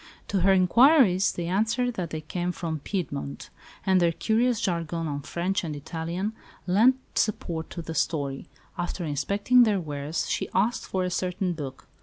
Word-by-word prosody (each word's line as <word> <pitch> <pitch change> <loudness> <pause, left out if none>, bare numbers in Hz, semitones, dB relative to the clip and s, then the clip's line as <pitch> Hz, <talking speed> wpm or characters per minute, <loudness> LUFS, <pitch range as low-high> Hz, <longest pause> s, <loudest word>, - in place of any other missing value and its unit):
To 200 - +1
her 190 +2 +4
inquiries 200 - +5
they 175 - -4
answered 220 +7 +1
that 180 -6 -4
they 155 0 -4
came 175 +3 -3
from 165 -3 -4
Piedmont; 75 - -4 0.3
and 190 -1 +4
their 170 -1 +4
curious 225 +6 +1
jargon 165 -2 -2
of 145 -1 -4
French 185 +3 -1
and 155 -3 -4
Italian 165 +7 -4 0.3
lent 215 +8 +5 0.2
support 170 -6 -1
to 170 - -6
the 165 - -5
story. 145 -2 -1 0.3
After 175 0 -3
inspecting 200 - +3
their 215 -4 +4
wares 150 -1 -3
she - - -2
asked 215 +6 +1
for 190 -1 -1
a 180 - -2
certain 180 0 -1
book. 135 -5 -7
180 Hz, 165 wpm, -26 LUFS, 160-200 Hz, 0.3 s, inquiries